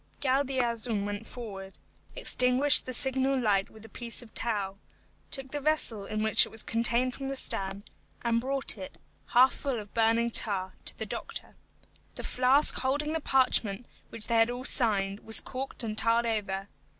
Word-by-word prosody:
Galdeazun 250 Hz, -6 st, 0 dB
went 205 Hz, +2 st, -5 dB
forward, 195 Hz, -6 st, -9 dB, 0.4 s
extinguished 255 Hz, +3 st, +4 dB
the -, -, -3 dB
signal 265 Hz, +1 st, +2 dB
light 200 Hz, -5 st, +1 dB
with 220 Hz, 0 st, -14 dB
a -, -, -10 dB
piece 235 Hz, +2 st, -3 dB
of 225 Hz, -, -18 dB
tow, 200 Hz, -4 st, -2 dB, 0.5 s
took 270 Hz, -1 st, -6 dB
the 290 Hz, -, -3 dB
vessel 275 Hz, -9 st, +1 dB
in 215 Hz, 0 st, -2 dB
which 220 Hz, -1 st, +6 dB
it -, -, -3 dB
was 225 Hz, -, -7 dB
contained 235 Hz, +2 st, +1 dB
from 270 Hz, +1 st, -6 dB
the 275 Hz, -, -3 dB
stern, 195 Hz, -5 st, -3 dB, 0.4 s
and 230 Hz, -1 st, +1 dB
brought 270 Hz, -4 st, 0 dB
it, 185 Hz, -, -9 dB, 0.3 s
half 255 Hz, +2 st, +5 dB
full 275 Hz, -4 st, -3 dB
of 205 Hz, -1 st, -11 dB
burning 230 Hz, +1 st, +2 dB
tar, 190 Hz, -4 st, +2 dB
to -, -, -5 dB
the -, -, -5 dB
doctor. -, -, -6 dB, 0.6 s
The -, -, -7 dB
flask 260 Hz, +4 st, +4 dB
holding 290 Hz, +4 st, -1 dB
the 320 Hz, -, -2 dB
parchment 250 Hz, -5 st, +1 dB, 0.2 s
which 225 Hz, -2 st, -3 dB
they 230 Hz, -, +1 dB
had 225 Hz, +1 st, +4 dB
all 245 Hz, +1 st, -5 dB
signed 200 Hz, -6 st, +1 dB
was 220 Hz, 0 st, 0 dB
corked 265 Hz, -1 st, -5 dB
and 215 Hz, -2 st, -4 dB
tarred 230 Hz, +2 st, +2 dB
over. 200 Hz, -4 st, -2 dB
235 Hz, 175 wpm, -28 LUFS, 215-260 Hz, 0.6 s, which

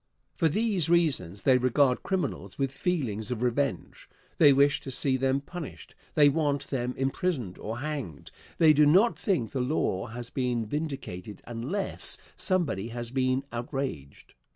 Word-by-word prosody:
For 165 Hz, -, +2 dB
these 200 Hz, -3 st, +1 dB
reasons 135 Hz, -, +1 dB
they 130 Hz, -2 st, +5 dB
regard 130 Hz, +1 st, +2 dB
criminals 185 Hz, -7 st, -3 dB
with 135 Hz, -1 st, 0 dB
feelings 130 Hz, -, -2 dB
of 125 Hz, -1 st, -3 dB
revenge. 135 Hz, +3 st, -2 dB, 0.3 s
They 145 Hz, -3 st, +8 dB
wish 140 Hz, +1 st, +4 dB
to -, -, -7 dB
see 130 Hz, +1 st, +1 dB
them 135 Hz, +1 st, +1 dB
punished. 165 Hz, +2 st, -9 dB, 0.2 s
They 150 Hz, -2 st, +6 dB
want 145 Hz, -1 st, 0 dB
them 125 Hz, -2 st, -2 dB
imprisoned 135 Hz, -, -2 dB
or 110 Hz, +2 st, -5 dB
hanged. 140 Hz, -, -5 dB, 0.3 s
They 160 Hz, -3 st, +6 dB
do 150 Hz, 0 st, +5 dB
not 195 Hz, +10 st, +4 dB
think 160 Hz, -, 0 dB
the 130 Hz, -, -1 dB
law 125 Hz, -8 st, -1 dB
has 120 Hz, +1 st, -8 dB
been 125 Hz, -3 st, -1 dB
vindicated 135 Hz, -, -5 dB
unless 130 Hz, -, 0 dB, 0.2 s
somebody 170 Hz, -, 0 dB
has 120 Hz, 0 st, -6 dB
been 130 Hz, 0 st, +1 dB
outraged. 120 Hz, -, -5 dB
135 Hz, 150 wpm, -28 LUFS, 120-155 Hz, 0.3 s, They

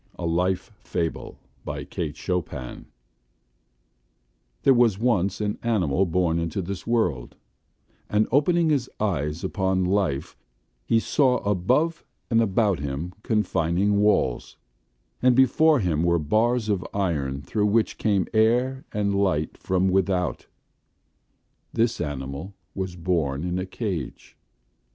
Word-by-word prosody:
A 85 Hz, -, -4 dB
Life 90 Hz, +4 st, 0 dB
FableKate 80 Hz, -2 st, -5 dB
Chopin 80 Hz, -9 st, -4 dB, 1.8 s
There 135 Hz, -, +6 dB
was 120 Hz, -5 st, +3 dB
once 100 Hz, -5 st, +1 dB
an 105 Hz, -1 st, -2 dB
animal 95 Hz, -6 st, +1 dB
born 85 Hz, -1 st, +1 dB
into 85 Hz, +2 st, -2 dB
this 95 Hz, +3 st, -6 dB
world, 95 Hz, -, 0 dB, 0.7 s
and 105 Hz, +1 st, +2 dB
opening 160 Hz, +4 st, +3 dB
his 135 Hz, -4 st, 0 dB
eyes 80 Hz, -5 st, -1 dB
upon 95 Hz, -1 st, 0 dB
Life, 90 Hz, -8 st, 0 dB, 0.5 s
he 115 Hz, -, +4 dB
saw 130 Hz, +1 st, +2 dB
above 130 Hz, -, +1 dB, 0.3 s
and 115 Hz, 0 st, +4 dB
about 100 Hz, -3 st, +1 dB
him 70 Hz, +5 st, -4 dB
confining 100 Hz, -2 st, +1 dB
walls, 105 Hz, -12 st, +1 dB, 0.6 s
and 125 Hz, -1 st, +4 dB
before 150 Hz, +4 st, +4 dB
him 80 Hz, -5 st, 0 dB
were 85 Hz, 0 st, +3 dB
bars 110 Hz, +9 st, +1 dB
of 100 Hz, -4 st, 0 dB
iron 75 Hz, -8 st, -1 dB
through 105 Hz, -1 st, 0 dB
which 110 Hz, +2 st, +1 dB
came 100 Hz, -3 st, +2 dB
air 125 Hz, +4 st, +2 dB
and 100 Hz, -1 st, 0 dB
light 95 Hz, -6 st, 0 dB
from 95 Hz, 0 st, 0 dB
without; 95 Hz, -1 st, 0 dB, 1.3 s
this 115 Hz, -1 st, +1 dB
animal 70 Hz, +5 st, -5 dB, 0.2 s
was 95 Hz, -2 st, -4 dB
born 80 Hz, -5 st, -1 dB
in 90 Hz, +1 st, -2 dB
a 90 Hz, -, -4 dB
cage. 95 Hz, -, -5 dB
95 Hz, 120 wpm, -25 LUFS, 85-110 Hz, 1.8 s, There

